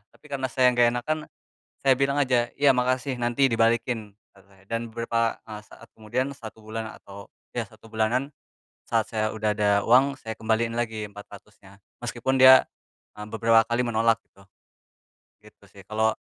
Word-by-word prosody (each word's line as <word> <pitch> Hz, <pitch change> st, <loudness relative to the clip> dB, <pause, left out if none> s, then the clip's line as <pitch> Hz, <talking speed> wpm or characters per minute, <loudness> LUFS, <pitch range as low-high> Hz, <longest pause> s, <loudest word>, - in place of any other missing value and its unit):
Tapi -, -, -27 dB
karena 135 Hz, -2 st, -3 dB
saya 125 Hz, 0 st, +3 dB
enggak 120 Hz, -1 st, +4 dB
enakan, 155 Hz, +6 st, -2 dB, 0.6 s
saya 135 Hz, -1 st, +5 dB
bilang 140 Hz, +1 st, +1 dB
aja 125 Hz, -3 st, +2 dB
"Iya, 140 Hz, -1 st, +4 dB
makasih 130 Hz, +1 st, 0 dB
nanti 120 Hz, +3 st, +1 dB
dibalikin," 115 Hz, -1 st, 0 dB, 0.2 s
kata 95 Hz, -, -21 dB
saya 95 Hz, -1 st, -23 dB
dan 115 Hz, -1 st, -4 dB
beberapa, 115 Hz, -1 st, -1 dB
eee, 105 Hz, 0 st, -7 dB
saat -, -, -16 dB
kemudian, 125 Hz, +5 st, -2 dB
1 110 Hz, -1 st, -11 dB
bulan 110 Hz, +1 st, -6 dB
atau 100 Hz, 0 st, -12 dB, 0.3 s
ya 115 Hz, -, -1 dB
1 115 Hz, 0 st, -18 dB
bulanan, 115 Hz, +5 st, 0 dB, 0.6 s
saat 115 Hz, -2 st, 0 dB
saya 110 Hz, -1 st, -1 dB
udah 110 Hz, -1 st, -1 dB
ada 105 Hz, -1 st, +2 dB
uang, 130 Hz, +5 st, +4 dB
saya 110 Hz, -1 st, -6 dB
kembaliin 115 Hz, +1 st, -1 dB
lagi 110 Hz, -3 st, -3 dB
400-nya 100 Hz, -1 st, -15 dB, 0.2 s
meskipun 120 Hz, +2 st, -2 dB
dia 130 Hz, 0 st, +8 dB, 0.5 s
eee, 105 Hz, -, -7 dB
beberapa 115 Hz, 0 st, +3 dB
kali 120 Hz, +1 st, 0 dB
menolak, 115 Hz, 0 st, +1 dB
gitu. 100 Hz, -, -21 dB, 0.9 s
Gitu -, -, -21 dB
sih. -, -, -14 dB
Kalau 110 Hz, +1 st, +1 dB
115 Hz, 165 wpm, -25 LUFS, 110-125 Hz, 0.9 s, dia